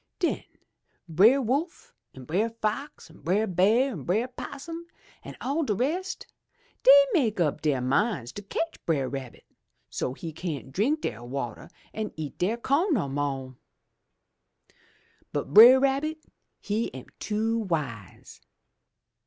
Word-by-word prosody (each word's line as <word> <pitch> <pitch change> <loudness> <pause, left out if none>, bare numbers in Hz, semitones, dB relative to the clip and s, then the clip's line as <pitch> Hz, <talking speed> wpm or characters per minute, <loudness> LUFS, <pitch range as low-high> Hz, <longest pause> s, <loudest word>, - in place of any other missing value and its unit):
'*Den 350 - -1 0.6
Brer 205 - +5
Wolf 275 +8 -2 0.2
an' 130 - -10
Brer 195 - 0
Fox 230 +5 -4
an' 160 - -17
Brer 190 +8 +1
Bear 215 +8 +3
an' 175 - -6
Brer 215 - 0
'Possum 330 +6 -8 0.4
an' - - -9
all 280 +5 -1
de 220 -9 0
rest, 350 - -2 0.6
dey - - +8
make 235 - +1
up 155 -5 +1
de 145 -4 +1
minds 135 - 0
to 205 - -8
cotch 325 +11 -4
Brer 145 -6 +1
Rabbit, 130 -2 -7 0.5
so's 130 - -4
he 165 -2 -5
cyan't 155 -6 -5
drink 255 - +1
dere 110 - -3
wateh 125 +3 -5 0.2
an' 215 -1 -4
eat 155 -3 -6
dere 205 +6 +1
co'n 290 - +1
no 180 - 0
mo'! 135 -2 -3 1.8
But 140 - -4
Brer 240 +6 +10
Rabbit 275 +4 0 0.4
he 215 +3 -2
am 130 - -8
too 225 +2 -1
wise. 145 - -5
210 Hz, 135 wpm, -27 LUFS, -, 1.8 s, Brer